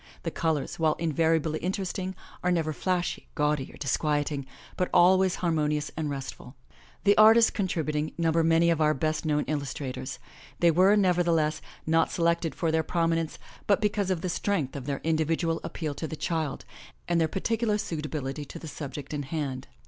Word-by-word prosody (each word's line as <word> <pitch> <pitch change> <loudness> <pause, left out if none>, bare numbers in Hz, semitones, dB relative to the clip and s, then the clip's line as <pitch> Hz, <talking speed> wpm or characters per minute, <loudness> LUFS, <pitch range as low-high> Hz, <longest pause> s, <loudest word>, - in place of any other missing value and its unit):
The 165 - -2
colors, 160 -3 -1
while 155 -1 +3
invariably 160 -1 +1
interesting, 190 +1 -3 0.3
are 180 - +2
never 160 -3 0
flashy, 180 +2 -2
gaudy 150 -3 0
or - - -14
dis 140 - 0
quieting, 145 -2 -1 0.3
but 180 - 0
always 185 +1 +5
harmonious 150 -3 0
and 155 -2 -2
restful. 135 -2 -7 0.5
The 205 0 +5
artists 225 +1 +7
contrib 185 -5 -1
uting 150 +1 -3
number 165 -1 +2
many 165 +1 +4
of 160 -1 0
our 155 0 +3
best 155 +3 -1
known 150 -1 +2
illustrators. 135 -3 -4 0.4
They 170 -1 +5
were, 185 +5 +5
nevertheless, 170 -5 +2 0.2
not 165 0 +2
selected 170 -1 +1
for 165 - 0
their 160 0 +2
prominence, 165 -1 0 0.3
but 200 -1 +4
because 205 -2 0
of 180 -3 0
the 185 - -2
strength 170 -7 -1
of 135 -1 -6
their 140 -1 -2
individual 165 +1 0
appeal 155 -4 -4
to 160 - -5
the 160 - -5
child, 160 -3 -2 0.4
and 170 -1 +2
their 160 - +3
particular 220 +4 0
suitability 150 -6 -4
to 145 - -9
the 165 - -8
subject* 145 -1 -7
in 145 - -2
hand. 135 -3 -4
160 Hz, 170 wpm, -27 LUFS, 150-175 Hz, 0.5 s, artists